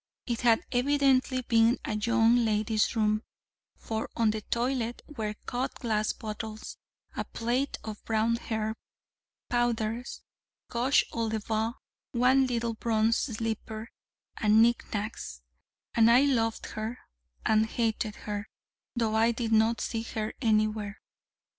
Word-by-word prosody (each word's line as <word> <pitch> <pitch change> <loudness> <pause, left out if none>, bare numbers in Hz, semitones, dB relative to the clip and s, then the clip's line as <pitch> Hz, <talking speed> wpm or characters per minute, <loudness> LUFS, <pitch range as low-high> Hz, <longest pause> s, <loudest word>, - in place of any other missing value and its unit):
It 235 -2 -2
had 230 -2 +4
evidently 260 0 +2
been 230 +1 +4
a - - -2
young 230 +2 +4
lady's 215 -1 +1
room: 215 -1 +2 0.6
for 220 -1 -4
on 225 -2 +3
the 215 0 -4
toilette 240 +1 -1
were 220 -8 -4
cut 250 +2 -2
glass 215 -3 0
bottles, 215 0 -6 0.4
a - - -1
plait 245 +4 -1
of 215 -1 -7
brown 225 +1 +1
hair, 220 -2 -2 0.7
powders, 240 0 -1 0.5
rouge 250 +4 +3
aux 230 -1 -1
lèvres, 220 +1 -1 0.4
one 260 +2 +4
little 235 -2 -1
bronze 225 0 +2
slipper, 225 -1 -3 0.5
and 215 0 +4
knick 235 +1 +3
knacks, 65 - -4 0.5
and 230 0 +5
I 240 +2 +7
loved 230 -5 +1
her 220 +3 -4 0.5
and 220 0 +4
hated 220 -2 -1
her, 205 +1 -4 0.5
though 225 -2 0
I 225 +1 +4
did 230 -1 -3
not 220 +1 +4
see 225 - -2
her 220 -1 -4
anywhere. 215 -2 +1
225 Hz, 130 wpm, -29 LUFS, 215-240 Hz, 0.7 s, I